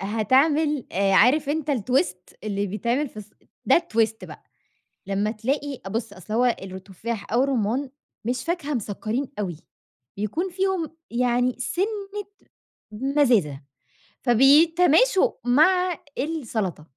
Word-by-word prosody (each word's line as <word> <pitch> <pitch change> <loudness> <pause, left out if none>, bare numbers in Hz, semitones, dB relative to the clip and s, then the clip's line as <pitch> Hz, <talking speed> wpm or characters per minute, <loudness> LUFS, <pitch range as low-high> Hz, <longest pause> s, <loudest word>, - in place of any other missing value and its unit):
هتعمل 270 +8 +2
آآ 195 +1 +1
عارف 275 +8 +4
أنت 300 0 -1
الtwist 250 - -1
اللي 205 -1 -1
بيتعمل 235 +8 -1
في - - -23
الص 210 0 -9 0.3
ده - - +5
الtwist 225 -9 -1
بقى - - -12 0.6
لمّا 200 +2 0
تلاقي 270 +5 -3
أ - - -3
بُص 225 +1 -3
أصل 195 +3 -7
هو 245 - +3 0.2
الرو 190 -1 -7
التفاح 200 +4 -6
أو 245 +2 +3
الرُمان 255 +1 -1 0.3
مش 245 +3 -2
فاكهة 330 -4 -2
مسكرين 230 +3 -3
أوي 180 -6 -3 0.6
بيكون 215 - -2
فيهم 375 -2 -1 0.2
يعني 245 +1 +1
سِنة 355 +10 -1 1.1
مزازة 240 - +1 0.6
فبيتماشوا 325 - +5
مع 360 +7 +3 0.2
السلطة. 230 - -3
245 Hz, 120 wpm, -24 LUFS, 210-300 Hz, 1.1 s, ده